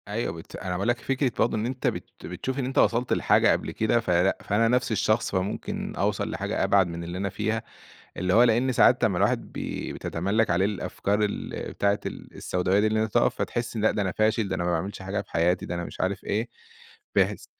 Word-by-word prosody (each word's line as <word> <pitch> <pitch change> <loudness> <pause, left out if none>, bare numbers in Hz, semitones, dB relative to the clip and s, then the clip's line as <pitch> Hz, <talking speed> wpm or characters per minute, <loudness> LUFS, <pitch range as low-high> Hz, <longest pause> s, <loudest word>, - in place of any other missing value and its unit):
أيوه 105 -4 -2
بت 80 0 -10
أنا 95 - -5
باقول 90 +5 -1
لك 120 +1 +1
فكرة 135 0 0
برضه 110 - +2
إن 110 - -1
أنت 125 +1 -2
بت - - -3 0.2
بتشوف 130 - -4
إن 130 - -1
أنت 130 - -4
وصلت 120 +1 +3
لحاجة - - +4
قبل - - -1
كده 110 +2 +1
فلأ 90 -3 +2
فأنا 115 +3 +2
نَفْس 125 +1 +1
الشخص 110 +2 +1
فممكن 95 +1 -3
أوْصل - - 0
لحاجة - - -2
أبعد 95 -3 +4
من 85 0 -6
اللي 85 +1 -5
أنا 100 +1 -1
فيها، 110 +3 -2 0.5
اللي 90 +1 0
هو 115 - +7
لإن 125 +2 +3
ساعات 120 - +4
لمّا - - +2
الواحد - - 0
بي - - -4
بتَتَملًّك 100 +6 0
عليه 90 +2 +3
الأفكار 100 0 -1
ال 105 - -2 0.2
بتاعة 100 +1 +1
ال - - -7
السوْداويّة 95 +4 +1
اللي 110 0 +1
أنت 110 - -4
تقف - - +3
فتحس 120 -1 -3
لأ 110 0 +3
ده 105 - -1
أنا 95 -2 0
فاشل، 110 +1 +1
ده 95 - -1
أنا 90 - -2
ما 90 - 0
باعملش 95 +3 -3
حاجة 95 +1 -2
في - - -18
حياتي، 90 +2 +1
ده - - -4
أنا 85 - -3
مش - - -6
عارف 95 +1 -1
إيه، 110 +4 -1 0.7
بحيث - - +2
105 Hz, 220 wpm, -26 LUFS, 95-115 Hz, 0.7 s, هو